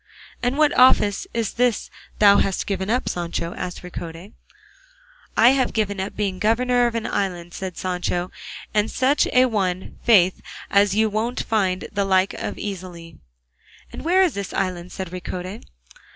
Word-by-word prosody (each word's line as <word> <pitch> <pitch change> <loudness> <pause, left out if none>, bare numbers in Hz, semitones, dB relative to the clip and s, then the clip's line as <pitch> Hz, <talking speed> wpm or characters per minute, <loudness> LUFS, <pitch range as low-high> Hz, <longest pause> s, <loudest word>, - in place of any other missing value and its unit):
"And 245 +3 0
what 305 -1 +3
office 250 - +4
is 230 -3 -2
this 245 -2 0 0.3
thou 200 -1 +6
hast 195 - 0
given 195 0 -3
up, 250 +3 0
Sancho?" 170 -1 -3
asked 180 0 -6
Ricote. 175 +2 -8 1.0
"I 230 +2 +7
have 265 -1 +2
given 205 -3 -1
up 190 +2 -4
being 195 -3 -2
governor 245 +3 +2
of 235 - -4
an 230 - -2
island," 175 -3 -3
said 190 -2 -6
Sancho, 180 -1 -2 0.4
"and 210 0 +2
such 265 +3 +2
a 255 0 +4
one, 190 -6 -2
faith, 190 -6 +4 0.3
as 200 0 +4
you 220 +1 +3
won't 220 +4 -2
find 195 -4 0
the 200 -1 0
like 190 0 +2
of - - -5
easily." 175 -5 -7 0.7
"And - - -7
where 365 +4 +4
is 355 - +1
this 200 -2 -5
island?" 180 -1 -2
said 185 -2 -6
Ricote. 185 +2 -6
200 Hz, 160 wpm, -22 LUFS, 185-230 Hz, 1.0 s, I